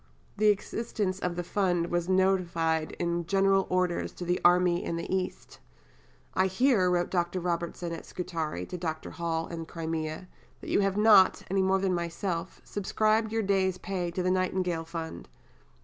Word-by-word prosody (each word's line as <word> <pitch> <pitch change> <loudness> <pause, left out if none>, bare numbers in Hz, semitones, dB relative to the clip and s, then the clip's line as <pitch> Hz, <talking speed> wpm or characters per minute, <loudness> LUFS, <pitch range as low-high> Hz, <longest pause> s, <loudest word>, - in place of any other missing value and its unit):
'" - - -33
The 215 - +4
existence 205 -1 0
of 180 -2 -2
the 175 - -2
Fund 175 -2 0
was 175 +1 0
notified 175 -4 +1
in 170 -1 -2
General 195 0 +3
Orders 180 -1 0
to 175 - -7
the 175 +1 0
army 175 0 +4
in 170 - -2
the 170 - -4
East. 65 - -4 0.7
"I 185 +1 +3
hear," 195 -1 +3
wrote 175 -1 +1
Dr. 175 0 0
Robertson 170 0 -3
at 165 - -7
Scutari 165 - -4
to 180 - -7
Dr. 160 -2 -4
Hall 165 -1 -2
in 170 0 -6
the 165 - -5
Crimea, 160 +1 -4 0.3
"that - - -7
you - - +3
have 195 -1 +1
not 210 -3 +6
(any 195 0 +2
more 190 0 +3
than 190 -1 0
myself) 170 0 -3
subscribed 215 +2 0
your 225 0 0
day's 190 -2 +1
pay 185 -3 -3
to 180 +1 -3
the 185 - +2
Nightingale 185 -2 0
Fund. 165 -1 -6
180 Hz, 175 wpm, -29 LUFS, 170-190 Hz, 0.7 s, not